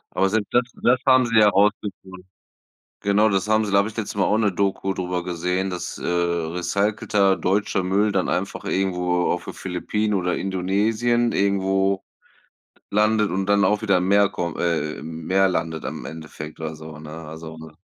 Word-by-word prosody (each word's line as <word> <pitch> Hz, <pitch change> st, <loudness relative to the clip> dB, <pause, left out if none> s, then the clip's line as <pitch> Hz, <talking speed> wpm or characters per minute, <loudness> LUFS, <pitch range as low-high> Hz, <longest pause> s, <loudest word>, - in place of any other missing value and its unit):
Aber 95 Hz, -, +3 dB
selbst 105 Hz, +1 st, -1 dB
das 125 Hz, -, +5 dB, 0.2 s
das 125 Hz, +1 st, +4 dB
haben 130 Hz, -1 st, +6 dB
sie 115 Hz, -1 st, 0 dB
ja 105 Hz, -1 st, +7 dB
rausgekriegt. 100 Hz, -2 st, -1 dB, 0.8 s
Genau 105 Hz, +2 st, +3 dB
das 95 Hz, 0 st, 0 dB
haben 110 Hz, 0 st, +2 dB
sie 100 Hz, -, -4 dB
da 100 Hz, -, +4 dB
habe 100 Hz, -, +1 dB
ich 110 Hz, -, -9 dB
letztens 110 Hz, -2 st, -4 dB
mal 95 Hz, -, +3 dB
auch 105 Hz, -, +2 dB
‘ne 110 Hz, -3 st, +2 dB
Doku 95 Hz, 0 st, -1 dB
drüber 90 Hz, -1 st, -3 dB
gesehen, 90 Hz, +2 st, -2 dB
dass, 90 Hz, -1 st, -5 dB
äh, -, -, -7 dB
recycelter 90 Hz, +4 st, 0 dB
deutscher 95 Hz, 0 st, 0 dB
Müll 100 Hz, +3 st, +2 dB
dann 95 Hz, -2 st, 0 dB
einfach -, -, -3 dB
irgendwo 90 Hz, -2 st, 0 dB
auf 85 Hz, 0 st, -3 dB
den -, -, -7 dB
Philippinen 105 Hz, +4 st, -2 dB
oder 90 Hz, -2 st, 0 dB
Indonesien 105 Hz, +6 st, 0 dB
irgendwo 95 Hz, 0 st, +1 dB, 0.9 s
landet 105 Hz, 0 st, +2 dB
und 95 Hz, +2 st, -1 dB
dann 100 Hz, 0 st, +3 dB
auch 105 Hz, 0 st, +2 dB
wieder 100 Hz, -4 st, +3 dB
im 90 Hz, +1 st, -1 dB
Meer 100 Hz, 0 st, +5 dB
kommt 85 Hz, -5 st, -4 dB
äh, 80 Hz, -3 st, -1 dB
im 80 Hz, 0 st, -8 dB
Meer 95 Hz, +1 st, +3 dB
landet 80 Hz, -3 st, -2 dB
im -, -, -5 dB
Endeffekt 80 Hz, -1 st, -8 dB
oder 80 Hz, -1 st, -4 dB
so, 80 Hz, 0 st, -10 dB
ne, 75 Hz, 0 st, -10 dB
also, 80 Hz, 0 st, -9 dB
ne? 80 Hz, -1 st, -12 dB
95 Hz, 185 wpm, -23 LUFS, 90-105 Hz, 0.9 s, ja